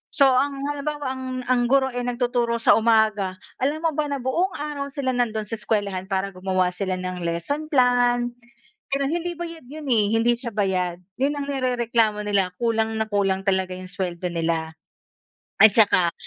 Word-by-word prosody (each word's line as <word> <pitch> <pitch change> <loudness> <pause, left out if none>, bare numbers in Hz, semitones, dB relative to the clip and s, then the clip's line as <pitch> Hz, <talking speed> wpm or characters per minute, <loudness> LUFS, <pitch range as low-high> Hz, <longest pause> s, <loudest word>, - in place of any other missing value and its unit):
So, 275 -3 +6
ang 275 +2 +1
halimbawa, 290 -1 -3
ang 260 0 -6 0.2
ang 245 -1 +2
guro 265 0 +3
ay 245 0 -3
nagtuturo 240 -1 0
sa - - +4
umaga, 215 -4 +2 0.2
alam 290 +4 0
mo 325 - +2
ba 300 0 0
na 280 -1 -2
buong 350 +9 0
araw 290 -1 -4
sila 265 -2 0
nandun 225 -3 0
sa 225 - -3
eskuwelahan 200 -3 -2
para 195 0 -1
gumawa 185 -1 0
sila 185 0 -2
ng 185 0 -4
lesson 170 - -2
plan. 245 -2 +3 0.6
Pero 275 0 +1
hindi 345 +1 -2
bayad 335 -4 -7
yun, 300 +1 -8
eh. 215 -2 +3
Hindi 230 +1 +3
siya 235 -3 -6
bayad. 180 -3 0 0.2
Yun 280 +2 +1
ang 280 - -3
nirereklamo 235 -5 +1
nila. 195 -3 +1
Kulang 225 -1 +1
na 220 - 0
kulang 195 -2 +1
talaga 190 -2 0
yung 185 0 -8
sweldo 180 -2 -4
nila. 165 -1 -1 0.9
At 215 -2 +8
tsaka, 185 -6 +4
230 Hz, 175 wpm, -23 LUFS, 190-270 Hz, 0.9 s, At